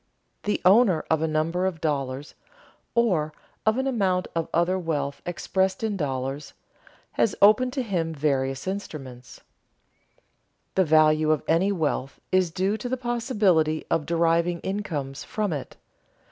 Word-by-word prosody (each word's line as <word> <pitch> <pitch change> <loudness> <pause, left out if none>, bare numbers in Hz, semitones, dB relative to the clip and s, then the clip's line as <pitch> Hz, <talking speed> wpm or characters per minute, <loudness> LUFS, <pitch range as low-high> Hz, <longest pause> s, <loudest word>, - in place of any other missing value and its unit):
The 210 - 0
owner 190 -3 +5
of 160 -1 +3
a 160 - +1
number 165 +4 0
of 175 -4 -4
dollars 140 -2 -2 0.6
(or 180 -10 +2 0.3
of 220 +2 +4
an 265 - 0
amount 195 -8 +1
of 165 -1 -2
other 175 +3 +1
wealth 145 -5 -2
expressed 190 +3 -1
in 215 -2 0
dollars) 135 -3 -3 0.6
has 220 - +1
open 215 +5 +6
to 260 0 -2
him 175 -7 -1
various 135 -3 -1
investments. 135 -11 -7 1.3
The 190 - +3
value 155 0 +4
of 155 -2 +2
any 175 +5 +3
wealth 150 -7 -2
is 185 -2 +3
due 190 +5 0
to 245 +3 -5
the 260 - -1
possibility 210 - +1
of 155 - 0
deriving 170 +1 +2
incomes 155 -9 -4
from 210 -5 -2
it. 140 -4 -6
170 Hz, 140 wpm, -25 LUFS, 155-200 Hz, 1.3 s, open